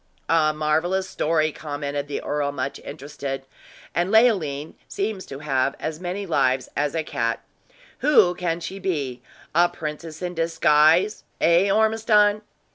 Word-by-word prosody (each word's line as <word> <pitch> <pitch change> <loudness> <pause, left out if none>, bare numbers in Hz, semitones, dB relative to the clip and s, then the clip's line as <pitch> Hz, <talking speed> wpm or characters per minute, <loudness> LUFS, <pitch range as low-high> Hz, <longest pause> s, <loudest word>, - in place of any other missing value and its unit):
"A 160 -2 +4
marvelous 160 +5 0
story," 155 -2 +1
commented 145 -1 -4
the 145 - -4
earl, 145 -1 -1
much 140 -1 -4
interested. 135 -1 -6 0.5
"And 175 +3 0
Leoline 185 - +2
seems 200 -1 -3
to 135 - -7
have 135 -2 0
as 155 0 -4
many 185 +3 -4
lives 135 -6 +1
as 145 +1 -1
a 160 - 0
cat! 115 -5 -2 0.6
Who 230 -12 +5
can 175 -1 -2
she 195 +3 -6
be 145 -10 -2 0.3
a 175 +2 +4
princess 155 0 -7
in 180 0 -3
disguise 165 +3 +3 0.2
eh, 170 +4 +4
Ormiston?" 215 0 +3
160 Hz, 135 wpm, -23 LUFS, 145-185 Hz, 0.6 s, Who